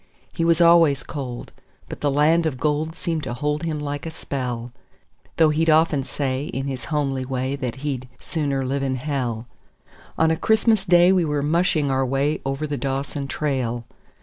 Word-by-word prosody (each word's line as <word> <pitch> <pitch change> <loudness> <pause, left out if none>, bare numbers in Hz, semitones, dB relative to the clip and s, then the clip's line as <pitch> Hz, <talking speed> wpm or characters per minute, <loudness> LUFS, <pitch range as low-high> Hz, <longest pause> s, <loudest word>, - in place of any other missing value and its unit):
He 165 - -1
was 165 0 +3
always 170 -5 +5
cold, 125 -4 -6 0.4
but - - -8
the 145 - +2
land 155 +4 +3
of 130 -5 -4
gold 155 +2 0
seemed 165 -4 -2
to 120 - -4
hold 150 +3 -1
him 160 -3 -2
like 145 +1 -4
a - - -2
spell; 125 -6 -4 0.7
Though 160 -2 +5
he'd 160 +2 +1
often 155 -3 +4
say 135 0 -2
in 135 -2 -4
his 135 -2 -4
homely 140 -4 -1
way 130 +1 -2
that 125 -4 -3
he'd 130 -3 -3
"sooner 140 -4 -2
live 135 +2 -1
in 135 -1 0
hell". 125 -4 -2 0.7
On 160 0 +3
a - - +2
Christmas 220 -1 +2
Day 175 +1 +6
we 185 -2 +3
were 150 -2 -1
mushing 155 -2 +2
our 135 0 +2
way 135 +4 0
over 135 +3 -2
the 145 -1 -3
Dawson 140 +1 -3
trail. 130 -6 -2
145 Hz, 180 wpm, -23 LUFS, 135-160 Hz, 0.7 s, Day